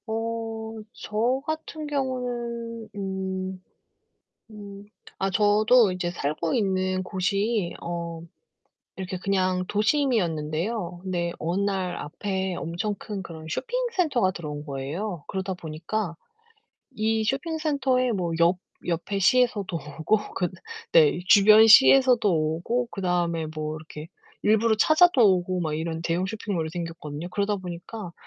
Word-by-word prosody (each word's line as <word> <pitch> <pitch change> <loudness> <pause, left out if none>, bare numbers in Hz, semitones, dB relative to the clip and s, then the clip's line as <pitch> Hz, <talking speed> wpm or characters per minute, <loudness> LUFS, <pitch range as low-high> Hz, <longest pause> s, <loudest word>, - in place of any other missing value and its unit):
어. 225 0 -3 0.2
저 235 +5 -1
같은 315 0 -4
경우는 240 -4 -3
음. 190 -1 -4 0.9
음. 200 -2 -10 0.3
아, 195 - 0
저도 210 +2 +4
이제 180 -1 -2
살고 160 0 -2
있는 185 -3 0
곳이 195 +1 -1
어 170 -1 -5 0.8
이렇게 185 -1 -4
그냥 185 -1 0
도심이었는데요. 185 - 0
근데 175 -2 -2
어느 170 +4 -1
날 190 -3 -1
앞에 190 +4 -3
엄청 170 +6 -3
큰 205 -3 -6
그런 160 -3 -9
쇼핑 - - -3 0.2
센터가 290 - +2
들어온 150 -5 -6
거예요. 150 +6 -4
그러다 190 0 -3
보니까 170 +3 -4 0.8
이 220 -2 0
쇼핑 275 +8 -1
센터에 265 -5 +1
뭐 180 -5 -1
옆 170 +2 +4 0.3
옆에 175 +4 -2
시에서도 205 -4 +2 0.2
오고 210 +6 0
그 180 -2 0 0.4
네, 475 - +5
주변 215 +3 +8
시에서도 250 0 +7
오고 170 +9 0
그다음에 175 -4 -1
뭐 155 0 -3
이렇게 155 0 -10 0.3
일부러 220 +1 +3
찾아도 310 +4 +5 0.2
오고 180 0 -2
막 155 -2 -2
이런 160 +1 -3
대형 170 +2 0
쇼핑몰이 195 -5 -3
생겼거든요. 165 -1 -6
그러다 200 +2 0
보니까 180 +1 -7
195 Hz, 265 characters per minute, -25 LUFS, 170-225 Hz, 0.9 s, 주변